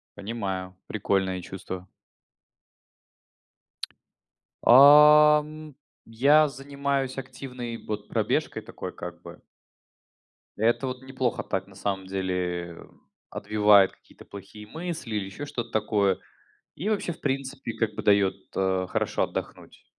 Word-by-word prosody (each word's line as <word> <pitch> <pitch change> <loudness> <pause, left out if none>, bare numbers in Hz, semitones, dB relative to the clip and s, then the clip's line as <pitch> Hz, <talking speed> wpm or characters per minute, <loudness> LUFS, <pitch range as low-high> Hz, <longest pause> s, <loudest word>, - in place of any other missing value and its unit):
Понимаю, 95 -3 -5
прикольное 95 -3 -1
чувство. 95 0 -8 2.7
Ам, 150 +2 +6 0.3
я 140 +7 +4
занимаюсь 140 -1 -3
активной 125 -2 -7
вот 105 -1 -6
пробежкой - - -1
такой, - - -8
как - - -8
бы. - - -12 1.2
Это 115 +5 +1
вот 130 0 -5
неплохо 130 -2 -2
так, 95 0 -3
на 95 - -17
самом 95 -1 -3
деле, 90 -3 -3 0.5
отбивает 105 -2 +4
какие-то - - -19
плохие 105 +1 -11
мысли 160 -5 -5
или 100 -2 -1
еще 105 +10 -7
что-то 120 -4 -5
такое, 105 -3 +1 0.6
и 190 +8 -4
вообще, 205 -5 -1
в - - -14
принципе, 135 -2 -3
как 110 -2 -1
бы - - -5
дает, 100 -2 +3 0.2
э, 95 -1 0
хорошо - - 0
отдохнуть. - - -7
115 Hz, 110 wpm, -26 LUFS, 95-140 Hz, 2.7 s, Ам